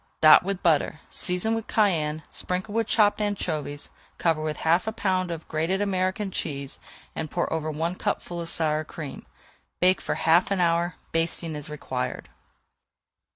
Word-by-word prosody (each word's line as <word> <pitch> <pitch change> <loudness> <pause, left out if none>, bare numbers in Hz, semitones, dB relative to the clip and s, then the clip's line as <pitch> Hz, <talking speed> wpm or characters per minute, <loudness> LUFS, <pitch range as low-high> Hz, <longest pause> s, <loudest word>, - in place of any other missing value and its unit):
Dot 155 -1 +9
with 195 0 -3
butter, 155 -2 +2
season 180 +5 +1
with 225 -1 -3
cayenne, 160 -8 +1
sprinkle 185 +3 -3
with 225 -1 +1
chopped 210 -1 +3
anchovies, 155 -8 -2 0.3
cover 165 -2 +1
with 155 -1 -2
half 170 +5 +3
a - - +1
pound 185 -4 0
of 165 -1 -6
grated 165 +5 0
American 195 0 0
cheese, 140 -5 -3 0.4
and 155 - -3
pour 175 +1 -1
over 155 -1 -2
one 160 +3 -1
cupful 175 -1 -3
of 165 - -3
sour 155 -1 +1
cream. 155 -2 -8 0.5
Bake 185 +1 +4
for - - -2
half 165 +3 +3
an 195 -1 0
hour, 170 0 +2 0.2
basting 165 0 -1
as 150 0 -5
required. 130 -4 -4
170 Hz, 155 wpm, -26 LUFS, 155-190 Hz, 0.5 s, Dot